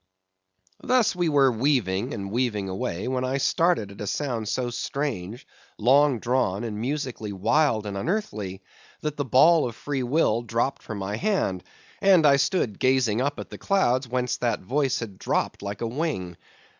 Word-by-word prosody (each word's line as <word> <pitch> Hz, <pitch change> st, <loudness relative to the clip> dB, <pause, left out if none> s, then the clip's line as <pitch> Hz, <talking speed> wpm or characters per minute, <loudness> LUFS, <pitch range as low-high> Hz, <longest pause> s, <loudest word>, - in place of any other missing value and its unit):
Thus 250 Hz, -6 st, +2 dB
we 175 Hz, -2 st, +1 dB
were 140 Hz, -3 st, +4 dB
weaving 120 Hz, -3 st, 0 dB
and 100 Hz, 0 st, -5 dB
weaving 110 Hz, -5 st, -1 dB
away 95 Hz, 0 st, -3 dB
when 130 Hz, 0 st, -1 dB
I 130 Hz, +1 st, 0 dB
started 165 Hz, -, +1 dB
at 100 Hz, -, -11 dB
a 105 Hz, -, -4 dB
sound 120 Hz, -4 st, -2 dB
so 125 Hz, 0 st, -1 dB
strange, 120 Hz, -5 st, -4 dB, 0.3 s
long 135 Hz, +4 st, +4 dB
drawn, 115 Hz, -4 st, 0 dB
and 110 Hz, -2 st, -4 dB
musically 130 Hz, -5 st, -3 dB
wild 110 Hz, +3 st, +1 dB
and 100 Hz, -1 st, -4 dB
unearthly, 100 Hz, -, -3 dB, 0.4 s
that 150 Hz, -1 st, -3 dB
the 145 Hz, -, -1 dB
ball 155 Hz, +5 st, +5 dB
of 115 Hz, -, -10 dB
free 140 Hz, 0 st, -3 dB
will 125 Hz, -3 st, +1 dB
dropped 120 Hz, +3 st, -1 dB
from 110 Hz, -, -7 dB
my 100 Hz, +2 st, -3 dB
hand, 115 Hz, -, 0 dB, 0.4 s
and 185 Hz, -5 st, +5 dB
I 140 Hz, -1 st, +6 dB
stood 135 Hz, -, 0 dB
gazing 130 Hz, -4 st, +2 dB
up 145 Hz, +2 st, -1 dB
at -, -, -8 dB
the -, -, -8 dB
clouds 130 Hz, -10 st, +1 dB
whence 125 Hz, 0 st, -1 dB
that 120 Hz, -2 st, -1 dB
voice 135 Hz, +3 st, 0 dB, 0.2 s
dropped -, -, -1 dB
like 100 Hz, 0 st, -6 dB
a 115 Hz, -, -1 dB
wing. 115 Hz, -, -3 dB
125 Hz, 170 wpm, -25 LUFS, 105-145 Hz, 0.4 s, I